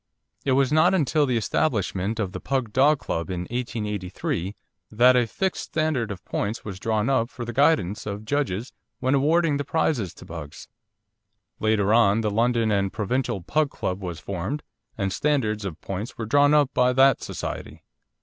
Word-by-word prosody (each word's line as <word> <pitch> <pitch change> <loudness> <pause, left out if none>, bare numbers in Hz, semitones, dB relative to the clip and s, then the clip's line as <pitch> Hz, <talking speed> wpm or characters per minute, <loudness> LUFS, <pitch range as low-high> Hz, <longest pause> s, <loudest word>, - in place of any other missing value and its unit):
It 135 - +2
was 135 0 +3
not 175 +5 +5
until 150 -3 +2
the 125 -2 +1
establishment 110 - -1
of 100 -4 -1
the 95 - -6
Pug 130 -4 -2
Dog 145 +3 +5
Club 85 -9 -4
in 90 -2 -3
1883 105 - -3 0.3
that 125 +4 +5
a 120 -2 +3
fixed 190 - -2
standard 155 -7 -1
of 95 -3 -7
points 105 +3 -3
was 95 -3 -6
drawn 110 +1 0
up 130 -4 +1
for 120 - -7
the 120 - -5
guidance 115 - +2
of 105 +1 -5
judges 125 -4 -2 0.3
when 130 +1 +1
awarding 150 +2 +3
the 145 - -2
prizes 140 - 0
to - - -13
Pugs. 80 -4 -9 0.9
Later 110 -1 +2
on 110 -2 +4
the 105 -1 0
London 115 0 +2
and 100 -1 +1
Provincial 110 -1 -1
Pug 150 - +1
Club 95 -5 -4
was 85 -4 -5
formed, 100 - -4 0.3
and 100 -3 -1
standards 110 -8 0
of 90 -4 -5
points 100 +6 -5
were 115 - -3
drawn 145 +5 +4
up 145 -3 +3
by 125 0 +3
that 135 0 +5
society. - - -6
115 Hz, 175 wpm, -25 LUFS, 100-140 Hz, 0.9 s, not